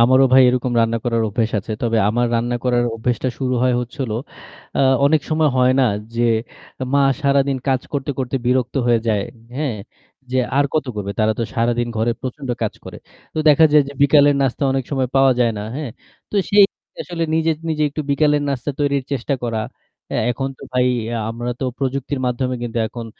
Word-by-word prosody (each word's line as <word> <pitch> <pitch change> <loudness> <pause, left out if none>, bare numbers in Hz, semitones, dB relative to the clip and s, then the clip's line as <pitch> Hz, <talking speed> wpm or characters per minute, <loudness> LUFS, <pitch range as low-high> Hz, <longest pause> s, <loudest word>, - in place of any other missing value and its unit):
আমারও 130 +3 +6
ভাই 130 0 +8
এরকম 125 0 0
রান্না 115 0 +1
করার 115 -2 +1
অভ্যেস 110 +2 -1
আছে। 105 +3 -5
তবে 115 -1 +1
আমার 120 +3 +1
রান্না 120 +1 0
করার 120 -1 +2
অভ্যেসটা 120 +3 -1
শুরু 130 -1 -1
হয় 130 -1 +3
হচ্ছিলো, 125 -1 -4 0.6
আ - - +2 0.2
অনেক 155 +2 +4
সময় 155 0 +3
হয় 125 0 +4
না - - +4 0.3
যে 120 - 0 0.7
মা 140 - +4 0.2
সারাদিন 140 -1 +2
কাজ 130 -2 +2
করতে, 140 -1 -2
করতে 130 0 -1
বিরক্ত 125 0 +1
হয়ে 120 -1 +3
যায়, 105 -2 +1 0.3
হ্যাঁ? 140 -6 -2 0.5
যে 130 - +1 0.2
আর 140 - +4
কত 155 -2 +1
করবে। 100 -1 -3
তারা 110 0 +3
তো - - 0
সারাদিন 120 0 0
ঘরে 115 +2 +1
প্রচণ্ড 130 +1 -6
কাজ 110 - -1
করে। - - -9 0.4
তো - - -2
দেখা 150 +2 +6
যায় 150 -1 +7
যে - - -7
বিকেলের 145 0 +5
নাস্তা 135 +1 -1
অনেক 135 -1 -1
সময় 135 -3 0
পাওয়া 135 -1 +5
যায় 120 -2 +3
না, - - -4
হ্যাঁ? 145 -4 -4 0.4
তো - - -9 0.2
সেই 205 0 +7 0.4
আসলে 170 -2 -5
নিজে, 160 0 +2 0.2
নিজে 155 -1 0
একটু 145 - -5
বিকেলের 145 +1 +2
নাস্তা 140 +1 -2
তৈরির 140 -2 +1
চেষ্টা 140 +1 -1
করা। 115 -2 -1 0.5
অ্যা - - 0
এখন 135 +3 -2
তো - - -14
ভাই 125 0 +2 0.2
ইয়া 115 0 -3
আমরা 120 +2 -4
তো - - -1
প্রযুক্তির 135 0 -2
মাধ্যমে 125 +1 -1
কিন্তু 120 -1 -3
এখন 120 -2 -7
130 Hz, 195 wpm, -20 LUFS, 120-140 Hz, 0.7 s, ভাই